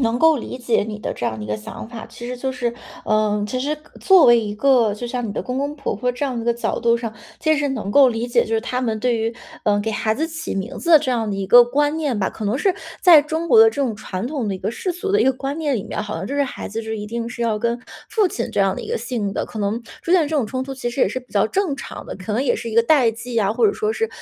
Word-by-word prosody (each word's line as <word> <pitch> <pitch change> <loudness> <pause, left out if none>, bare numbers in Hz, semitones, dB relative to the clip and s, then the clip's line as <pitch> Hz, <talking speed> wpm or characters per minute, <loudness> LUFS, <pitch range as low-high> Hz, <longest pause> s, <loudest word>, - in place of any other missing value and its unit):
能 235 -1 +1
够 320 +1 +5
理 250 - -6
解 240 -3 +1
你 210 0 -5
的 - - -3
这 120 - -3
样 110 - -2
的 105 - -6
一 - - -7
个 105 - -2
想 105 - -8
法。 235 -2 -8
其 240 - -9
实 250 - -4
就 265 +2 -2
是 245 -2 -2 0.3
呃， 210 -1 +1
其 255 +4 -3
实 300 +3 -1 0.2
作 380 -4 +6
为 240 -1 +7
一 210 -1 -4
个 240 -3 +3
就 240 +3 -6
像 245 -1 -3
你 - - -4
的 - - -3
公 250 +1 -4
公 285 +2 -2
婆 275 - -3
婆 250 +4 -1
这 250 +4 -3
样 250 -4 -2
一 - - -6
个 235 - +2
角 235 - -2
度 235 0 +3
上， 230 -2 -5 0.2
其 315 -1 +2
实 290 -1 0
能 220 -7 -3
够 275 +3 +7
理 235 0 -2
解 240 -1 +3
就 225 - -2
是 220 - +2
他 250 0 -2
们 225 -4 -1
对 240 +1 +1
于， 225 +1 -1 0.3
呃， 205 -1 +3
给 220 +2 -2
孩 220 0 0
子 315 +7 -1
起 325 -5 -5
名 195 +7 -4
字 340 - -2
的 310 - +10
这 260 - -2
样 225 -3 -1
的 200 - -2
一 195 -1 -3
个 240 +5 +9
观 290 +5 +1
念 280 -8 -1
吧， 190 - +1
可 215 - -7
能 215 +5 0
是 375 +4 +2 0.3
在 335 -5 +9
中 320 +3 -3
国 445 +5 +7
的 450 - +9
这 - - -5
种 230 -4 -2
传 205 0 -5
统 260 -7 -3
的 195 - -1
一 - - -6
个 215 - -2
世 365 +9 -3
俗 395 +3 -3
的 425 - +4
一 - - +4
个 265 - +5
观 275 +3 -4
念 290 -5 0
里 200 - -4
面， - - -4
好 210 - -5
像 190 - -4
就 280 - -4
是 285 - +2
孩 270 - -5
子 220 +2 -4
就 220 - -5
一 210 -1 -5
定 230 +1 -4
是 240 0 -8
要 225 -2 0
跟 235 +2 -1 0.3
父 430 -4 +2
亲 235 -9 -3
这 - - -4
样 195 -1 +3
的 - - -6
一 - - -8
个 - - 0
姓 225 -4 -3
的， - - -1
可 220 - -8
能 210 +2 -1 0.2
出 340 - -4
现 350 -5 +5
这 310 - -3
种 270 - +2
冲 260 +3 -3
突 270 - -6
其 255 -2 -3
实 250 - -4
也 - - +4
是 255 - -4
比 250 - -25
较 205 0 +3
正 350 - -1
常 - - -8
的。 - - -6
可 190 +3 -5
能 235 - +1
也 275 - +1
是 230 -1 -5
一 - - -6
个 230 - +6
代 250 -3 +4
际 230 +2 -8
呀， 210 -3 +2
或 335 - +1
者 410 - +2
说 430 0 -1
是 450 0 -1
240 Hz, 350 characters per minute, -21 LUFS, 220-280 Hz, 0.3 s, 的